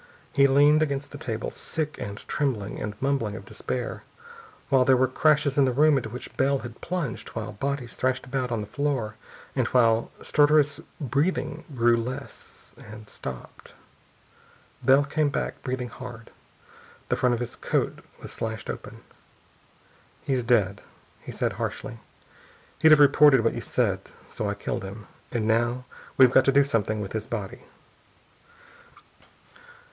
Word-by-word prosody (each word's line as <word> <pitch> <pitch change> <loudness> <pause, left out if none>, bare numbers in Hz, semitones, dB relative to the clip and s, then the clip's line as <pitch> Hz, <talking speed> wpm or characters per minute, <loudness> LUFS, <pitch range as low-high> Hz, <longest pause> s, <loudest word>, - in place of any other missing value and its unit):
He 140 0 +5
leaned 145 +3 +5
against 140 -2 -1
the 145 - -9
table, 115 -6 -4
sick 155 -2 -4
and 100 +1 -7
trembling 115 -9 -2
and 105 0 -5
mumbling 135 -6 0
of - - -9
despair, - - -4 0.7
while 135 -2 +5
there 130 0 +5
were 130 +1 +3
crashes 145 +1 +2
in 140 - +6
the 130 - +2
room 150 +4 +4
into 125 -5 -1
which 125 +3 -9
Bell 140 +1 +3
had 120 -1 -10
plunged, 170 - -3
while - - -4
bodies 140 +1 -3
thrashed 130 0 -1
about 130 -1 -2
on 115 -2 -1
the - - -5
floor, 135 -4 -2 0.4
and - - +1
while 115 -2 +3
stertorous 150 -1 +3 0.2
breathing 150 +3 -1
grew 120 -1 +4
less, 130 +4 -7
and 110 0 -11
stopped.... 65 -2 -9 1.1
Bell 135 +2 +5
came 150 +1 +1
back, 140 - -3
breathing 125 -2 -3
hard. 120 -3 -10 0.8
The - - +2
front 125 -1 +2
of - - -5
his 120 - -4
coat - - -1 0.2
was - - -9
slashed 110 0 -4
open. - - -10 1.2
"He's 130 -3 0
dead," 105 -5 +2 0.4
he - - -9
said - - -1
harshly. - - -5 0.8
"He'd 160 - +6
have 155 -1 +8
reported 145 -2 +7
what 115 - +1
you - - -4
said, - - 0 0.3
so 105 - -3
I 100 - -2
killed 100 +3 -3
him.... 100 +2 -8 0.3
And 115 -3 -1
now 120 +3 +1 0.3
we've 130 -2 +7
got 130 0 +5
to 135 - +5
do 140 +1 +5
something 110 -5 -1
with 100 - -6
his 110 0 -3
body." 115 +3 -5
130 Hz, 155 wpm, -26 LUFS, 115-140 Hz, 1.2 s, have